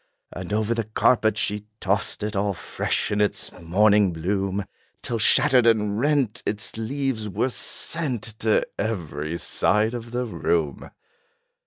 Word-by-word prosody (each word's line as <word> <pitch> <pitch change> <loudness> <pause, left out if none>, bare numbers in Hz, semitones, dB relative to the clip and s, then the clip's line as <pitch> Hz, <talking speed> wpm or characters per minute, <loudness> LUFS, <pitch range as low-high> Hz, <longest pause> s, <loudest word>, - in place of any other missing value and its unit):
And 90 +1 -7
over 110 +2 +1
the 115 -2 -2
carpet 110 0 +2
she 105 0 -2
tossed 100 +1 -1
it, 105 0 -3
All 100 0 0
fresh - - -2
in 105 0 +1
its 105 -1 -1
morning 100 +3 +3
bloom, 95 +4 -1 0.4
Till 115 -2 -2
shattered 125 +2 +4
and 105 -2 +2
rent, 135 -5 +1
its 105 0 -3
leaves 115 -1 -2
were 115 +7 0
sent 135 -5 -2 0.2
To 110 -1 +2
every 85 -7 -3
side 105 +5 +1
of 120 -1 -6
the 125 +1 -2
room. 80 - -1
105 Hz, 140 wpm, -24 LUFS, 100-115 Hz, 0.4 s, shattered